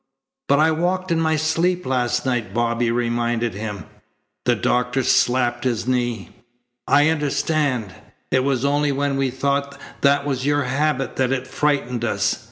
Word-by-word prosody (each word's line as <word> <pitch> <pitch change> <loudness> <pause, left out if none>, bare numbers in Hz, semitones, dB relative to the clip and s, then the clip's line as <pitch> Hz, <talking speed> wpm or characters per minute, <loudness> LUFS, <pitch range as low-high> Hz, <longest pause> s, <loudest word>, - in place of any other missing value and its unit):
"But 140 - +5
I 155 +2 +4
walked 180 +3 -1
in 165 - +2
my 160 -1 +2
sleep 170 +4 0
last 125 -1 0
night," 120 -4 -2
Bobby 120 0 +1
reminded 120 -1 0
him. 105 0 -6 0.6
The 125 - +3
doctor 125 +5 0
slapped 120 -1 +2
his 120 -4 -1
knee. 120 -6 -1 0.6
"I 145 +2 +4
understand. 145 - 0 0.4
It 130 - +3
was 135 -1 0
only 145 +1 +2
when 140 0 -1
we 135 -1 0
thought 140 +2 -2 0.2
that 140 0 +3
was 135 -3 -2
your 145 +1 +1
habit 135 0 -1
that 130 -1 +1
it 130 -1 -1
frightened 130 -4 -1
us. 115 - 0
130 Hz, 155 wpm, -21 LUFS, 120-145 Hz, 0.6 s, But